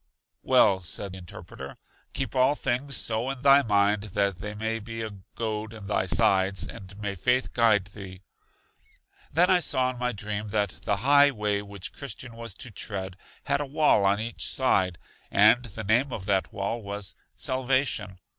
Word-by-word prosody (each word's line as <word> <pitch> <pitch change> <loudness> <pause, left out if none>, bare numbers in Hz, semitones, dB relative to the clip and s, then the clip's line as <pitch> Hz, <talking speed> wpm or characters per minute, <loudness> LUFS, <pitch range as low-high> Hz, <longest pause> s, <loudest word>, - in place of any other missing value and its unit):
Well, 95 -1 +4
said 95 +2 -4
Interpreter, 90 -2 -10 0.4
keep - - -2
all 130 +3 +4
things 135 +1 -1
so 115 +3 -1
in 135 -1 -5
thy 140 0 +7
mind 105 -3 +2 0.2
that 100 -2 +2
they 105 +3 -6
may 110 +1 -2
be 115 +1 -6
a 110 - -5 0.2
goad 110 -1 -3
in 105 -2 -10
thy 100 -2 0
sides; 95 +2 +3
and 95 0 -10
may 105 -1 -3
faith 125 +7 0
guide 110 -5 +4
thee! 95 -2 -10 1.1
Then 175 +4 +4
I 185 - +5
saw 130 -5 +1
in 125 - -10
my 125 0 0
dream 105 -1 -5
that 100 -2 -1
the 100 - +2
high 145 0 +7
way 105 -5 -1
which 100 -2 -8
Christian 130 -4 -7
was 115 -4 -7
to 120 -1 -5
tread, 95 -2 -4 0.3
had 140 0 0
a - - -2
wall 150 -7 +3
on 100 +1 +3
each 115 +1 -2
side, 95 -9 +1 0.3
and 125 0 +5
the 110 0 -7
name 120 +7 +2
of 100 -5 -5
that 95 -4 0
wall 100 +4 -3
was 100 -1 -5 0.2
Salvation. 130 -6 -1
105 Hz, 175 wpm, -27 LUFS, 100-125 Hz, 1.1 s, thy